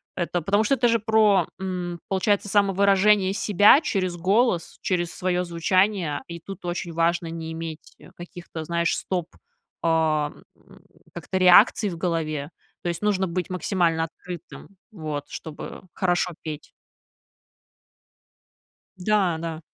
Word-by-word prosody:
Это 175 0 -2
потому 200 +6 +2
что 250 +6 +2
это 240 -1 +2
же 230 0 +2
про, 215 -5 +3
м, 180 -2 -4
получается, 200 +2 +1
самовыражение 200 0 +3
себя 205 - +5
через 190 - -1
голос, 190 0 +1
через 175 -2 -1
своё 180 -1 0
звучание. 180 -1 +1
И 170 0 -7
тут 195 +3 -10
очень 175 -1 -4
важно 170 +1 +1
не 165 0 -6
иметь, 160 -1 -8
э, - - -16
каких-то, 175 -2 -8
знаешь, 170 +1 0
стоп, 180 -3 -2 0.6
а, 155 -2 +2 0.2
м, - - -20 0.3
как-то 190 - -4
реакций 185 +4 +6
в 170 - -6
голове. 160 -4 -2 0.3
То 175 - -1
есть 170 0 -4
нужно 195 -3 +1
быть 180 0 -3
максимально 170 -2 0
открытым, 175 +1 -10 0.2
вот, 155 -7 -5
чтобы 155 -2 -8
хорошо 180 -1 0
петь. 155 -2 -7 2.3
Да, 185 -3 +1
да. 160 -1 -5
180 Hz, 130 wpm, -24 LUFS, 165-195 Hz, 2.3 s, реакций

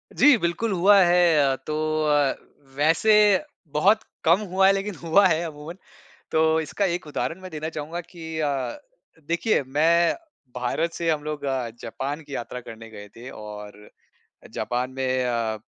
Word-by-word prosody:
जी, 285 -3 +6
बिल्कुल 200 +4 -1
हुआ 195 +3 +5
है 170 -6 +4
तो 150 - -2 0.3
अ, 145 -2 +2 0.4
वैसे 165 +9 +3 0.6
बहुत 200 +9 +4 0.2
कम 170 +4 +4
हुआ 190 +1 +4
है, 195 - +5
लेकिन 195 0 -3
हुआ 180 +5 +4
है 160 -2 +1
अमूमन। 155 +2 -8 0.5
तो 160 0 +3
इसका 160 +6 -2
एक 175 -2 -5
उदाहरण 165 +4 -4
मैं 185 0 -9
देना 155 -1 -5
चाहूँगा 160 +2 -5
कि 170 -1 -13 0.2
अ, 135 -5 -2 0.5
देखिए 170 +2 +1
मैं 165 +5 +3 0.4
भारत 160 +7 -1
से 165 -1 -1
हम 150 -2 -1
लोग 150 -1 -4 0.4
जापान 145 +3 -4
की 145 -2 -10
यात्रा 125 0 -5
करने 115 -1 -11
गए 105 -1 -11
थे 120 +3 -10
और 105 -2 -10 0.7
जापान 125 +1 -2
में 130 -1 0
अ, 115 -3 -1
155 Hz, 155 wpm, -24 LUFS, 130-175 Hz, 0.7 s, जी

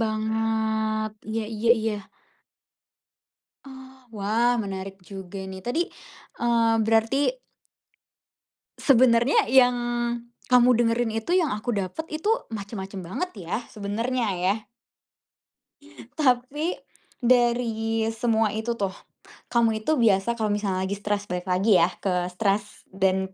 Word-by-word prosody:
banget. 220 0 0 0.2
Iya 220 +1 -1
iya 220 +1 -1
iya. 220 -1 -1 1.7
Oh, 265 -1 -12 0.2
wah 225 +4 +2
menarik 195 -1 -6
juga 190 +1 -9
ini. 190 0 -7
Tadi, 320 +9 0 0.5
eee, 230 -1 +3
berarti 230 - +2 1.4
sebenarnya 245 -1 +4
yang, 250 0 +6 0.8
kamu 250 0 +6 0.2
dengerin 230 0 +1
itu 225 +10 -2
yang 355 -4 +3
aku 230 +3 -3
dapet 200 - -3
itu 310 +6 -3 0.2
macem-macem 200 -2 -6
banget 190 - -4 0.2
ya, - - 0 0.2
sebenarnya 230 +4 -2
ya. 185 +3 +1 1.6
Tapi, 285 +4 +1 0.5
dari 235 -2 +2
semua 225 -1 +1
itu 220 +2 -1
tuh, 200 -4 -2 0.6
kamu 230 -2 +2
itu 310 +8 +1
biasa 230 0 +2
kalau 215 -2 0
misalnya 195 -3 -1
lagi 190 - -2
stres 205 0 -2
balik 180 -1 -5
lagi 190 +4 +3
ya 170 - +4
ke 180 -2 -1
stres, 200 +2 -2
dan 190 0 0
220 Hz, 115 wpm, -25 LUFS, 200-240 Hz, 1.7 s, yang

